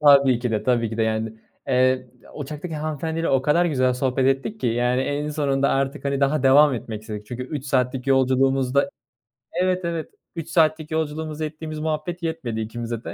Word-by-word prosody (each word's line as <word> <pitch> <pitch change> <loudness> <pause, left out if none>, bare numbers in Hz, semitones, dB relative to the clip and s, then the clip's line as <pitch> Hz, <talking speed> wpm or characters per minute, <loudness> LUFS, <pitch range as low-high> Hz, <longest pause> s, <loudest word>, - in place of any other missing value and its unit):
Tabii 140 -4 +6
ki 120 0 -2
de, 105 -1 0
tabii 120 -1 +1
ki 110 - -5
de 115 - +1
yani. 110 0 -1 0.4
Eee, 130 0 +3 0.3
uçaktaki 150 +3 -6
hanımefendiyle 160 +2 -2
o 135 -1 +3
kadar 170 +5 +3
güzel 130 -5 +2
sohbet 130 +1 +1
ettik 135 +11 0
ki - - 0
yani 120 +2 +1
en 145 +2 -1
sonunda 140 -2 +1
artık, 135 +2 -1
hani, 140 0 0
daha 140 +1 +2
devam 140 +1 +6
etmek 110 -2 -6
istedik. 105 -1 -7
Çünkü 125 +2 -5
3 140 +1 -5
saatlik 130 -1 0
yolculuğumuzda 135 +1 +3 0.7
Evet, 185 +1 0
evet, 170 -2 -3 0.3
3 165 -1 -5
saatlik 155 -1 +2
yolculuğumuzda 155 0 -2
ettiğimiz 155 0 -6
muhabbet 160 +3 -3
yetmedi 135 -9 -3
ikimize 115 +1 -4
de. - - -6
135 Hz, 180 wpm, -23 LUFS, 125-155 Hz, 0.7 s, Tabii